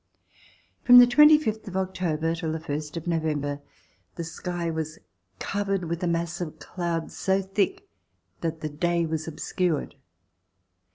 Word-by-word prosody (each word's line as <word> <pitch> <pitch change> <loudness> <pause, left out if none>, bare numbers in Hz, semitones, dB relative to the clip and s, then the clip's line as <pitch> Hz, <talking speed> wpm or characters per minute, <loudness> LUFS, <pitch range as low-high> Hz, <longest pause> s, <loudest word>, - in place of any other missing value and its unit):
From 245 0 +9
the 245 - +11
twenty 300 +5 +7
fifth 220 -7 -3
of 190 -1 -4
October 180 -4 -1
until 165 -1 -2
the 160 - -3
first 150 0 -5
of 165 - -6
November 150 -4 -1 0.5
the 170 - -4
sky 170 +1 -4
was 160 -1 -4 0.4
covered 195 -2 -1
with 170 0 -3
a 180 - 0
mass 170 +1 -1
of 160 -3 -5
clouds 170 -2 -4
so 190 0 +1
thick 210 - -1 0.5
that 160 -1 -3
the 155 - -3
day 170 +3 0
was 160 0 -3
obscured. 165 0 -2
170 Hz, 150 wpm, -26 LUFS, 160-190 Hz, 0.5 s, the